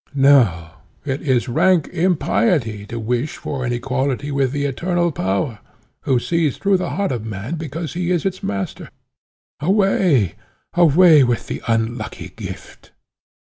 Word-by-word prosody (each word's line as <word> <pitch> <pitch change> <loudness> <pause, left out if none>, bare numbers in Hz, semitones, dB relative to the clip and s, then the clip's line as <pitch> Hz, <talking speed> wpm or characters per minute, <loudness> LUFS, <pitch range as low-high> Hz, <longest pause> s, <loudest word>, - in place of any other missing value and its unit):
No; 120 - +4 0.3
it 135 -1 -2
is 130 -4 +1
rank 170 +6 +3
impiety 120 - 0
to 115 - -5
wish 125 +6 -2
for 135 -3 -4
an 120 - -1
equality 130 +3 -2
with 135 -2 +1
the 145 0 -2
Eternal 175 +5 0
Power, 100 -1 -2 0.5
who 130 - +3
sees 160 +2 0
through 200 -1 +2
the 185 - -3
heart 200 -5 -1
of 120 -4 -3
man, 110 +5 -5
because 160 0 -5
he 175 0 -2
is 180 -1 0
its 185 -1 -2
master. 100 -1 -4 0.7
Away, 180 - +2 0.4
away 170 -2 +6
with 120 -2 0
the - - -5
unlucky 115 +1 -2
gift!" - - -10
140 Hz, 140 wpm, -20 LUFS, 120-170 Hz, 0.7 s, away